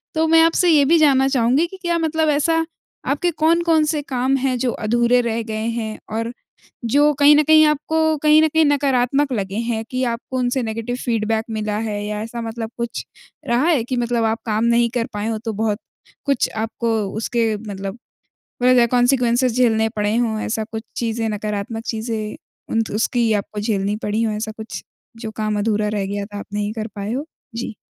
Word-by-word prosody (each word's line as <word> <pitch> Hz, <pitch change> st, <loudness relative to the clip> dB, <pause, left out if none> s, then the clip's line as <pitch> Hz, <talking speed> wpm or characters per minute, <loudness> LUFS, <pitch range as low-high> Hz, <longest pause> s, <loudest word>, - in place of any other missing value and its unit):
तो 320 Hz, +1 st, +2 dB
मैं 325 Hz, 0 st, +6 dB
आपसे 330 Hz, +2 st, +3 dB
ये 300 Hz, -3 st, +6 dB
भी 330 Hz, +4 st, +5 dB
जानना 270 Hz, -3 st, +4 dB
चाहूँगी 265 Hz, +4 st, +2 dB
कि 380 Hz, -, -11 dB
क्या 345 Hz, -1 st, 0 dB
मतलब 320 Hz, -1 st, +1 dB
ऐसा 325 Hz, +3 st, +2 dB, 0.5 s
आपके 345 Hz, +5 st, +1 dB
कौन-कौन 325 Hz, 0 st, +3 dB
से 305 Hz, -1 st, -1 dB
काम 265 Hz, -1 st, 0 dB
हैं 255 Hz, -1 st, 0 dB
जो 245 Hz, 0 st, 0 dB
अधूरे 235 Hz, +3 st, +2 dB
रह 230 Hz, -1 st, -1 dB
गए 220 Hz, 0 st, -4 dB
हैं? 220 Hz, -2 st, -4 dB
और 230 Hz, +2 st, -2 dB, 0.6 s
जो 295 Hz, +1 st, +5 dB
कहीं 290 Hz, +1 st, +8 dB
न 305 Hz, -, +5 dB
कहीं 310 Hz, +1 st, +6 dB
आपको 315 Hz, +1 st, +1 dB
कहीं 305 Hz, 0 st, +6 dB
न 315 Hz, -, +4 dB
कहीं 320 Hz, +1 st, +3 dB
नकारात्मक 275 Hz, -1 st, +2 dB
लगे 195 Hz, -3 st, -2 dB
हैं 225 Hz, -2 st, -2 dB
कि 255 Hz, 0 st, -2 dB
आपको 255 Hz, +2 st, -5 dB
उनसे 250 Hz, +1 st, 0 dB
नेगेटिव 230 Hz, +2 st, -3 dB
फीडबैक 225 Hz, -1 st, 0 dB
मिला 215 Hz, -1 st, -2 dB
है? 210 Hz, -2 st, -3 dB
या 210 Hz, 0 st, -3 dB
ऐसा 230 Hz, +2 st, -6 dB
मतलब 225 Hz, 0 st, -5 dB
कुछ 235 Hz, 0 st, -3 dB, 0.4 s
रहा 240 Hz, +5 st, +2 dB
है 305 Hz, -9 st, +2 dB
कि 255 Hz, +1 st, -3 dB
मतलब 235 Hz, -1 st, 0 dB
आप 225 Hz, -, -3 dB
काम 215 Hz, 0 st, 0 dB
नहीं 235 Hz, 0 st, +3 dB
कर 235 Hz, -2 st, 0 dB
पाए 210 Hz, +1 st, -3 dB
हों 225 Hz, -1 st, -2 dB
तो 225 Hz, -, -2 dB
बहुत 210 Hz, -2 st, 0 dB, 0.5 s
कुछ 280 Hz, -4 st, +1 dB
आपको 225 Hz, 0 st, -1 dB, 0.3 s
उसके 230 Hz, 0 st, 0 dB
मतलब 200 Hz, 0 st, -6 dB, 0.6 s
होए 255 Hz, 0 st, +5 dB
गे 240 Hz, -1 st, +5 dB
कौन्सिक्‍वन्सेस 245 Hz, 0 st, +3 dB
झेलने 225 Hz, -3 st, +3 dB
पड़े 210 Hz, +1 st, +1 dB
हों 230 Hz, -2 st, 0 dB
ऐसा 220 Hz, 0 st, -2 dB
कुछ 220 Hz, 0 st, -4 dB
चीज़ें 225 Hz, -1 st, -1 dB
नकारात्मक 210 Hz, +1 st, -4 dB
चीज़ें 220 Hz, -1 st, -4 dB, 0.3 s
उन 225 Hz, -, +2 dB
त 220 Hz, -, -7 dB
उसकी 230 Hz, +1 st, +1 dB
आपको 205 Hz, +1 st, -3 dB
झेलनी 205 Hz, -1 st, -1 dB
पड़ी 210 Hz, +2 st, 0 dB
हों 220 Hz, -2 st, 0 dB
ऐसा 220 Hz, 0 st, -4 dB
कुछ? 220 Hz, 0 st, -7 dB, 0.3 s
जो 225 Hz, -1 st, -6 dB
काम 215 Hz, -1 st, -1 dB
अधूरा 210 Hz, 0 st, 0 dB
रह 195 Hz, -1 st, -1 dB
गया 200 Hz, 0 st, -3 dB
था 205 Hz, 0 st, -8 dB
आप -, -, -7 dB
नहीं 205 Hz, 0 st, -2 dB
कर 220 Hz, -1 st, -4 dB
पाए 205 Hz, +2 st, -3 dB
हों? 275 Hz, +4 st, -2 dB, 0.3 s
जी। 230 Hz, -1 st, -4 dB
235 Hz, 200 wpm, -20 LUFS, 220-275 Hz, 0.6 s, कहीं